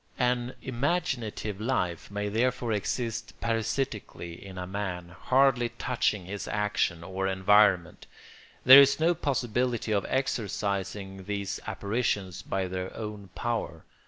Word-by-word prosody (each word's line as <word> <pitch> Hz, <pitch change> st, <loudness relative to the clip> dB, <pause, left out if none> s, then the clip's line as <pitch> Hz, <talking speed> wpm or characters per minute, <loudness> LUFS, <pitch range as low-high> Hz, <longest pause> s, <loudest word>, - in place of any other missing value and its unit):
An 125 Hz, 0 st, 0 dB
imaginative 120 Hz, -, -2 dB
life 90 Hz, -8 st, -1 dB
may 105 Hz, +1 st, -3 dB
therefore 120 Hz, +2 st, 0 dB
exist 115 Hz, +3 st, -3 dB
parasitically 115 Hz, -6 st, -2 dB
in 95 Hz, -1 st, -10 dB
a 90 Hz, -, -4 dB
man, 90 Hz, -2 st, -4 dB
hardly 125 Hz, +5 st, +2 dB
touching 110 Hz, -6 st, 0 dB
his 100 Hz, +2 st, -5 dB
action 105 Hz, -5 st, 0 dB
or 95 Hz, +2 st, -2 dB
environment. 95 Hz, -2 st, +3 dB, 0.6 s
There 130 Hz, +2 st, +12 dB
is 140 Hz, +1 st, +4 dB
no 165 Hz, +2 st, +4 dB
possibility 125 Hz, -6 st, -1 dB
of 100 Hz, -2 st, +1 dB
exorcising 100 Hz, -6 st, -2 dB
these 100 Hz, -1 st, -3 dB
apparitions 100 Hz, -4 st, -1 dB
by 95 Hz, -1 st, -2 dB
their 90 Hz, 0 st, -4 dB
own 105 Hz, -3 st, -6 dB
power. 120 Hz, -2 st, -3 dB
105 Hz, 120 wpm, -28 LUFS, 95-125 Hz, 0.6 s, There